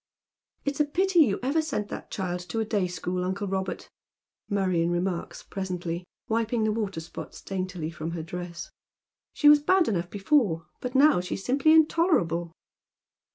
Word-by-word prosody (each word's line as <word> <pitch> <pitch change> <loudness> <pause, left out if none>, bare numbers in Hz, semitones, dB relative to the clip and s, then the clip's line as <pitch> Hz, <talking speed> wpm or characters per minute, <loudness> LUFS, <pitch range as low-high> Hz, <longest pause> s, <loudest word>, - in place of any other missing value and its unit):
" - - -49
It's 280 0 -2
a 300 - +4
pity 365 +4 +2
you 235 -11 +5
ever 285 +5 +2
sent 275 -10 -3
that - - -7
child 180 -2 -3
to 225 - -2
a 220 - 0
day 205 -4 0
school, 180 +1 -3
uncle 195 +2 -2
llobert," 190 -1 -3 0.6
Marion 185 -5 +1
reniarlcs 175 0 -3
presently, 180 -2 -4 0.2
wiping 225 0 0
the 215 0 +1
waterspots 195 -7 -5
daintily 185 -4 -3
from 160 -1 -5
her 165 -2 -4
dress. 175 0 -7 0.3
" - - -66
She 295 - +3
was 295 0 +9
bad 370 +3 +3
enough 175 -4 -1
before, 200 - +1
but 250 +1 -5
now 280 -7 +6
she 180 - -4
is 195 - -8
simply 275 +4 +3
intolerable." 305 - +3
195 Hz, 165 wpm, -27 LUFS, 175-270 Hz, 0.6 s, was